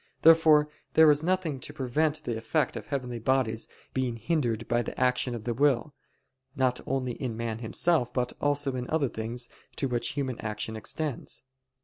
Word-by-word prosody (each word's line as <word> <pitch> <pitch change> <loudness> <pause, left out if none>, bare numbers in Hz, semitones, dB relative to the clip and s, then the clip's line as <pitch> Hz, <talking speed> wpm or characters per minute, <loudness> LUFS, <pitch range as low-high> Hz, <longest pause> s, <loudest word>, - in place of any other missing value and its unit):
Therefore 160 -2 +7 0.3
there 160 -1 +8
is 145 0 +2
nothing 170 -5 0
to 145 - -8
prevent 150 +3 0
the 120 - -2
effect 135 +7 0
of - - -6
heavenly 125 -4 -3
bodies 115 -2 +1 0.3
being 130 -3 0
hindered 120 -2 -1
by 120 0 +2
the - - -6
action 125 -1 +2
of 115 - -6
the 120 - -1
will, 140 +2 +2 0.6
not 130 -2 +1
only 130 -2 -1
in 120 -2 -4
man 115 -1 -3
himself, 125 +3 +1
but 125 -1 -1
also 145 -2 +1
in 125 -1 -4
other 150 -5 +1
things 115 +2 -4 0.3
to 135 - 0
which 120 -2 -1
human 130 -3 -2
action 110 0 -3
extends. 135 +6 -2
130 Hz, 170 wpm, -28 LUFS, 120-145 Hz, 0.6 s, there